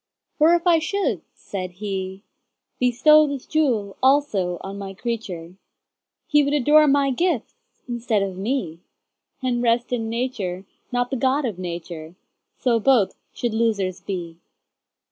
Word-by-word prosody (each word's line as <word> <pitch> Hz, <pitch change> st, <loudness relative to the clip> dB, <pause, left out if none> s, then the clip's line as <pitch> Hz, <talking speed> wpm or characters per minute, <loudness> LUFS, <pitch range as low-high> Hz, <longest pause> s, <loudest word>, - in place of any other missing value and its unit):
For 320 Hz, +3 st, +6 dB
if 345 Hz, +1 st, -1 dB
I 340 Hz, -2 st, +5 dB
should 395 Hz, +5 st, -1 dB
(said 185 Hz, -2 st, -6 dB
He)Bestow 215 Hz, -, +1 dB
this 280 Hz, -3 st, -5 dB
jewel 235 Hz, -11 st, 0 dB
also 260 Hz, -10 st, +2 dB
on 195 Hz, +1 st, -7 dB
My 195 Hz, -1 st, -7 dB
creature, 190 Hz, -6 st, -5 dB, 0.7 s
He 295 Hz, -1 st, +4 dB
would 285 Hz, +1 st, +1 dB
adore 300 Hz, +2 st, +5 dB
My 280 Hz, -1 st, +3 dB
gifts 320 Hz, -, 0 dB, 0.3 s
instead 235 Hz, -4 st, 0 dB
of 195 Hz, -2 st, -4 dB
Me, 190 Hz, -, -2 dB, 0.6 s
And 245 Hz, -2 st, 0 dB
rest 240 Hz, +1 st, +1 dB
in 225 Hz, -2 st, -1 dB
Nature, 220 Hz, -6 st, -3 dB, 0.3 s
not 245 Hz, 0 st, 0 dB
the 265 Hz, -, 0 dB
God 265 Hz, +3 st, +1 dB
of 210 Hz, -7 st, -4 dB
Nature:So 175 Hz, +7 st, -4 dB
both 235 Hz, -4 st, +3 dB, 0.2 s
should 240 Hz, -2 st, -3 dB
losers 210 Hz, -5 st, 0 dB
be. 170 Hz, -4 st, -5 dB
230 Hz, 130 wpm, -23 LUFS, 190-275 Hz, 0.7 s, For